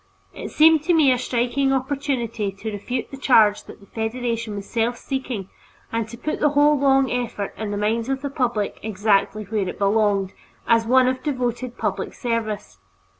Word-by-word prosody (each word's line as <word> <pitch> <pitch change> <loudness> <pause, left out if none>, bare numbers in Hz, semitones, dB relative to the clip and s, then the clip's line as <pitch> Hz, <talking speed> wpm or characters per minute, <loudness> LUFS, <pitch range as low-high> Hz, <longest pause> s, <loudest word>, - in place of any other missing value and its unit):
It - - -7
seemed 315 0 +5
to 350 - +3
me 295 -5 +5
a 250 - +2
striking 250 +3 0
opportunity 260 -6 -1
to 210 +3 -6
refute 210 +5 -4
the 275 - -7
charge 220 -6 +4
that - - -12
the - - -15
Federation 230 0 -3
was 200 0 -7
self 235 +1 -1
seeking 255 -8 -4 0.4
and 225 -1 -2
to 235 - -9
put 305 +6 -3
the 300 - +3
whole 295 +1 +6
long 270 -2 +3
effort 240 -5 -3
in 215 -1 -4
the 205 - -3
minds 225 +4 0
of 270 0 -2
the 280 - -3
public, 240 -6 -1
exactly 210 0 +1
where 205 -2 -2
it - - -7
belonged, 200 -1 +1 0.3
as 230 -1 +3
one 255 +1 +5
of 255 0 -1
devoted 250 -3 -3
public - - -3
service. 215 - -3
235 Hz, 180 wpm, -22 LUFS, 210-265 Hz, 0.4 s, whole